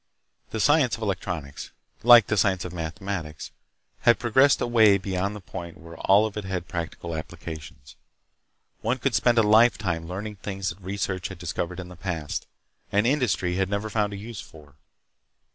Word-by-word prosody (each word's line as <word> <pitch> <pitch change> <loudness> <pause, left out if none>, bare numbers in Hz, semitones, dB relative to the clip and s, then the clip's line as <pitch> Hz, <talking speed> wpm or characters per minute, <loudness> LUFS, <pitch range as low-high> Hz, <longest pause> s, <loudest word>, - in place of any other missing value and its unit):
The 110 - -4
science 145 0 +4
of 115 - -7
electronics, 90 -8 -4 0.3
like 120 -2 +8
the 110 - 0
science 95 -2 +1
of 90 - -6
mathematics, 85 -1 -5 0.5
had 120 - +4
progressed 130 +4 +4
away 110 -4 +5
beyond 95 +1 -2
the - - -7
point 85 -2 -8
where 85 -2 -12
all 100 +3 +5
of 110 - -5
it 105 - -4
had 95 -2 -4
practical 85 0 -5
applications. 80 -4 -9 0.8
One 120 +4 0
could 130 0 -1
spend 120 -1 +3
a 115 - +6
lifetime 105 -6 +3
learning 100 +4 -6
things 95 -1 -4
that 90 +4 -9
research 95 -1 -3
had 95 - -9
discovered 90 +1 -4
in 90 -1 -7
the 90 - -11
past, 85 -4 -4 0.4
and 105 +2 +2
industry 100 -10 +1
had 95 -1 0
never 100 +2 -2
found 105 -2 0
a 100 - -6
use 110 0 -7
for. 75 -2 -15
95 Hz, 170 wpm, -25 LUFS, 85-110 Hz, 0.8 s, like